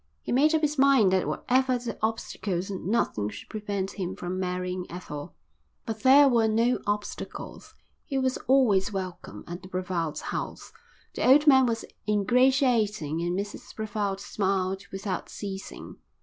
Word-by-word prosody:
He - - -4
made 300 +6 +4
up 315 - +2
his 300 -2 0
mind 265 -8 +5
that 190 0 +2
whatever 255 0 +1
the 240 -1 -5
obstacles 200 -4 -2
nothing 185 - -1
should 105 0 -10
prevent 200 -2 -4
him 185 0 -3
from 185 -1 -4
marrying 180 0 -3
Ethel. 150 -5 -7 0.5
But 220 -1 -4
there 275 +3 +7
were 235 -4 +3
no 230 +3 +2
obstacles. 205 0 -5 0.3
He 275 - -3
was 260 -1 +1
always 215 -7 +4
welcome 185 -3 -6
at 175 +1 -7
the 185 - -11
Brevalds' 180 -4 -3
house. - - -5 0.4
The - - 0
old 290 +3 +7
man 265 -3 +6
was 225 -1 -2 0.2
ingratiating 215 - +2
and 175 +1 -1
Mrs 200 +1 -6
Brevald 205 -3 -2
smiled 195 -1 -1
without 195 -1 -4
ceasing. 195 -1 -7
205 Hz, 150 wpm, -27 LUFS, 185-250 Hz, 0.5 s, there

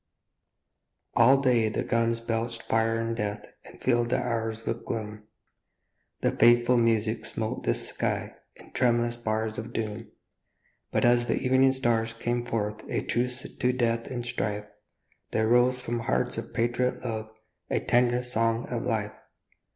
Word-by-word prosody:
ALL 130 +4 +6
day 120 -5 +3
the - - -2
guns 115 0 +1
belched 115 0 -2
fire 115 0 +1
and 115 0 -2
death 105 -2 -3 0.2
And - - -14
filled 120 -2 +2
the 125 - +2
hours 115 -2 -2
with 115 0 -3
gloom; 105 -1 -5 0.9
The - - +2
fateful 120 +1 +5
music 110 -1 +1
smote 110 0 -4
the - - +2
sky - - -2 0.2
In - - -16
tremulous 120 -1 +2
bars 110 -1 -2
of 115 +2 -7
doom; 110 0 -3 0.8
But - - +1
as 120 0 +4
the - - +1
evening 130 +1 +4
stars 115 -3 0
came 120 +1 -2
forth 105 -2 -2
A - - -1
truce 125 +1 -1 0.2
to 125 - +3
death 115 -2 0
and 120 -2 -4
strife, 105 -4 -2 0.6
There 110 0 +1
rose 125 +2 +4
from 120 -1 -3
hearts 115 - -1
of - - -8
patriot 120 +2 0
love 110 -2 -3 0.4
A - - +1
tender 120 0 +2
song 115 -1 0
of 120 -2 -2
life. 110 -4 -1
115 Hz, 150 wpm, -27 LUFS, 110-120 Hz, 0.9 s, ALL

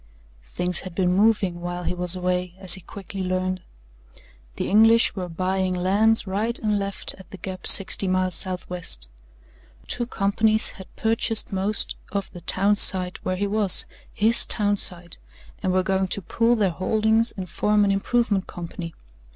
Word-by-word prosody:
Things 180 - -1
had 185 -2 -9
been 180 -1 +1
moving 200 -4 +1
while 175 0 -5
he - - -2
was 180 0 +1
away, 180 -1 -3
as 190 -2 -3
he 190 - -5
quickly 195 +2 -9
learned. 185 0 -2 0.9
The - - -4
English 225 +2 +4
were 180 -3 -5
buying 185 +2 -2
lands 205 +5 +2
right 210 +5 -1
and 210 -2 +1
left 200 0 -2
at 190 - -15
the 195 - -10
gap 185 -1 -7
sixty 195 0 +7
miles 185 0 0
southwest. 180 - -2 0.8
Two 240 - -3
companies 215 0 +1
had 190 - -13
purchased 225 0 0
most 195 +2 -1
of 200 -1 -4
the 175 - -11
town 200 +4 +1
site 185 -2 +6
where 185 - -2
he 200 +2 -2
was 205 -1 +4 0.3
HIS 225 +1 +3
town 205 -1 +1
site 175 -3 -3 0.4
and 190 -3 -1
were 185 0 +1
going 190 0 -1
to 200 - -1
pool 230 +7 +1
their 200 -5 0
holdings 220 +5 0
and 185 -1 -6
form 210 +4 +1
an 200 - +1
improvement 200 0 -1
company. 170 -1 -8
190 Hz, 165 wpm, -23 LUFS, 180-210 Hz, 0.9 s, sixty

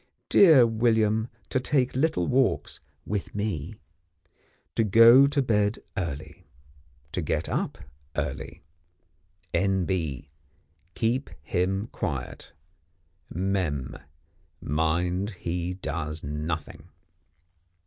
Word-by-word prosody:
Dear 155 -10 +7
William 110 -1 +2 0.2
to 130 - +1
take 130 -1 +1
little 130 - +1
walks 130 +5 +1 0.3
(with 105 -1 -4
me). 100 -3 -3 1.0
To 115 - +2
go 115 +6 +7
to 140 -1 +1
bed 105 -3 +1 0.2
early. 80 -5 -5 0.6
To - - -2
get - - -1
up - - -2 0.4
early. - - -4 0.9
N.B. 85 -6 0 0.7
Keep 120 +4 0
him 95 0 0
quiet. 65 -6 -5 0.8
Mem. 90 -8 -2 0.6
Mind 85 +6 0
he 90 +1 -2
does 80 -3 -4
Nothing." 75 +2 -5
95 Hz, 85 wpm, -26 LUFS, 80-115 Hz, 1.0 s, Dear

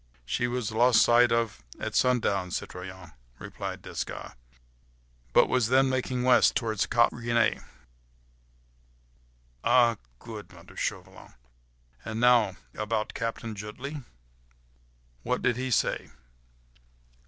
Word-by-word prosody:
"She 120 - -1
was 120 -3 -3
lost 120 +1 +4
sight 120 0 +5
of 115 - -1 0.2
at - - -4
sundown, 105 -7 +1
citoyen," 90 0 -7 0.3
replied - - -7
Desgas, - - -6 1.0
"but - - +5
was 125 -3 +1
then 130 +2 +4
making 130 -1 -1
west, 125 -1 +5
towards 110 -3 0
Cap 120 0 +3
Gris 120 -1 -9
Nez." 115 -1 +2 2.0
"Ah!—good!—" 115 - 0
muttered - - -13
Chauvelin, - - -5 0.7
"and 110 0 -4
now, 120 -5 +4 0.2
about 105 0 -2
Captain 115 0 -4
Jutley?—what - - -9
did 125 -2 +2
he 130 +1 -2
say?" 120 - 0
115 Hz, 105 wpm, -28 LUFS, 90-125 Hz, 2.0 s, sight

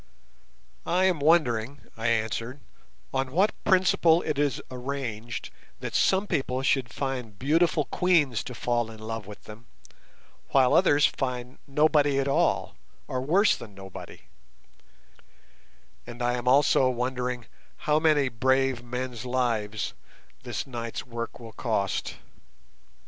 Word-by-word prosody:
"I 185 +2 +2
am 180 -4 +2
wondering," 140 -4 +2
I 115 +1 -2
answered, 115 +3 -1 0.5
"on 135 -1 -1
what 195 +8 +2
principle 180 -3 +4
it 145 - -2
is 145 -2 +1
arranged 125 -3 -5 0.3
that - - -5
some 190 +1 +3
people 130 -7 -1
should 130 -4 +1
find 125 -6 -4
beautiful 155 - +2
queens 150 - +2
to 125 - -7
fall 120 -1 0
in 110 - -10
love 110 -1 -5
with 105 - -11
them, 110 +2 -12 0.8
while 130 -2 +4
others 145 -6 +5
find 125 0 -3
nobody 145 0 +3
at 135 0 +1
all, 140 - +1 0.3
or 130 - -2
worse 185 +10 +3
than 105 -4 -11
nobody; 95 -1 -10 1.9
and 120 0 -6
I 120 0 +2
am 125 0 -4
also 135 0 +5
wondering 125 -1 -2 0.4
how 150 0 +3
many 155 -3 +3
brave 130 +1 +1
men's 125 -1 -5
lives 115 -5 -1 0.5
this - - -4
night's 115 -3 -5
work 115 -1 -6
will 115 -2 -10
cost." 110 -6 -2
130 Hz, 125 wpm, -27 LUFS, 115-145 Hz, 1.9 s, others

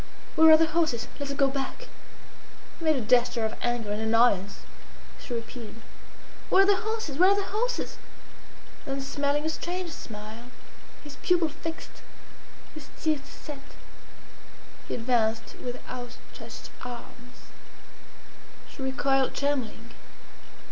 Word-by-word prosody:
Where 320 -1 +8
are 315 - +10
the 325 - +5
horses? 315 -7 +1
Let 285 -1 -3
us 280 - -3
go 275 - +5
back." 275 - -4 0.9
He 330 - -5
made 315 -1 +5
a 260 - 0
gesture 235 0 +3
of 220 - -1
anger 240 -3 -1
and 210 +1 -1
annoyance. 220 -3 +3 0.6
She - - -10
repeated: 230 -1 -5 0.7
"Where 385 - +7
are - - +4
the 400 0 +5
horses? 435 -10 -3
Where 370 +2 +8
are 400 - +5
the 400 - 0
horses?" 475 +5 -2 0.9
Then 275 0 -2
smiling 285 +2 0
a - - +2
strange 350 +2 -3
smile, 220 -1 -8 0.5
his 290 -2 -10
pupil 345 0 +3
fixed, 325 +2 -7 0.7
his 310 -3 -10
teeth 305 -3 0
set, 290 -2 -8 1.3
he - - -2
advanced 225 -2 +1
with 245 0 -4
outstretched 245 -1 -9
arms. 245 0 -10 1.2
She - - -10
recoiled 265 0 +1
trembling. 280 -4 -1
275 Hz, 130 wpm, -28 LUFS, 240-320 Hz, 1.3 s, are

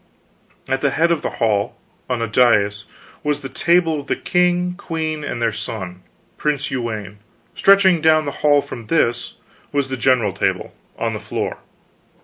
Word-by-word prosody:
At 135 0 -1
the 140 - +3
head 170 +4 +2
of 165 - +1
the - - -2
hall, 105 -1 0 0.3
on 120 -2 -1
a - - -1
dais, 105 -3 +3 0.4
was 150 0 -1
the 135 - -6
table 165 0 +2
of 140 - -10
the - - +1
king, 180 0 +1
queen, 160 -4 -4
and 125 - -4
their 115 - +1
son, 95 -4 -6 0.4
Prince 150 -1 -1
Uwaine. 110 -6 -4 0.3
Stretching 195 -4 +5
down 155 -1 +4
the 140 - -2
hall 145 -1 +4
from 120 -5 -9
this, 120 -7 0 0.4
was 140 -2 0
the 130 - -3
general 120 -6 +2
table, 100 - -1 0.2
on - - -1
the - - -4
floor. - - -4
140 Hz, 165 wpm, -20 LUFS, 115-160 Hz, 0.4 s, Stretching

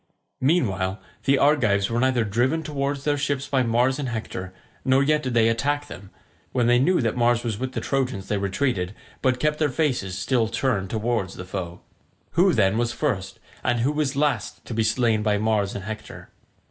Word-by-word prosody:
Meanwhile 100 - +1 0.3
the 140 0 +4
Argives 115 -9 +3
were 115 - +1
neither 130 -2 +2
driven 125 +10 0
towards 140 -2 -2
their 145 -1 +1
ships 140 -1 -1
by 135 -2 +2
Mars 125 +3 +2
and 135 -3 -2
Hector, 100 -5 -5 0.3
nor 130 +1 +4
yet 150 +1 +2
did 130 -4 -3
they 115 -1 +5
attack 145 +6 0
them; 95 +2 -10 0.4
when 125 -2 +2
they 120 +1 +4
knew 175 +6 +3
that 115 -2 0
Mars 120 -1 +2
was 110 -3 -3
with 130 0 -3
the - - -2
Trojans 130 -7 -1
they 105 - 0
retreated, 100 -1 -1 0.3
but 130 -2 +1
kept 150 +1 0
their 155 -2 +2
faces 125 - -1
still 120 -4 +1
turned 110 -4 -1
towards 110 -3 -1
the 95 - -7
foe. 90 -2 -5 0.5
Who, - - +4
then, 95 +4 +2
was 120 0 +1
first 100 -9 -2 0.2
and 120 -2 +1
who 140 +5 +1 0.2
last 140 -7 -1
to - - -6
be 115 - +1
slain 110 0 +2
by 105 -1 +1
Mars 105 -2 0
and 100 - -5
Hector? 110 +2 -8
120 Hz, 190 wpm, -24 LUFS, 105-135 Hz, 0.5 s, they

